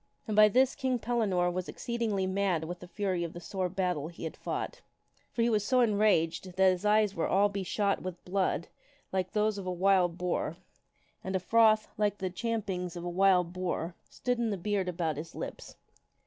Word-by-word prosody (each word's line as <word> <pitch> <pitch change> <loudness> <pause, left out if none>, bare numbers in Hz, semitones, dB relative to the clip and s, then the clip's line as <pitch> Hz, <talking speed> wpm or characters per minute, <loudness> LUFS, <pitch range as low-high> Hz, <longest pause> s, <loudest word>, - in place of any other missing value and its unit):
And 215 - -1
by 215 0 +8
this 255 +5 +3
King 260 -3 0
Pellinore 215 -7 +1
was 185 0 -4
exceedingly 225 -5 -2
mad 190 -3 0
with 175 +2 -5
the 180 - -10
fury 185 -2 -1
of 170 - -5
the 175 - -7
sore 185 +1 -3
battle 180 -5 -1
he 170 0 -10
had 160 - -4
fought. - - -4 0.5
For 230 - 0
he 235 - +3
was 210 -2 +2
so 255 +3 +3
enraged 200 -6 +2
that 190 0 +6
his 180 +1 -3
eyes 210 -1 +4
were 165 - -1
all 200 +2 +3
beshot 200 +1 -1
with 180 -1 -7
blood 185 -2 0 0.5
like 185 -1 -1
those 210 -1 +1
of 190 - -6
a - - 0
wild 180 -1 +3
boar, 175 -2 -2 0.7
and 190 0 -3
a - - +2
froth, 220 +2 +4
like 205 -1 +1
the 185 -2 -3
champ 225 +3 -2
ings 180 -2 -3
of 175 - -6
a 175 - -3
wild 180 -1 +3
boar, 180 -2 -2 0.2
stood 245 -1 -2
in 235 -1 +1
the 200 - -1
beard 190 0 -1
about 165 -4 -2
his 160 +2 -7
lips. - - -7
190 Hz, 205 wpm, -30 LUFS, 175-210 Hz, 0.7 s, by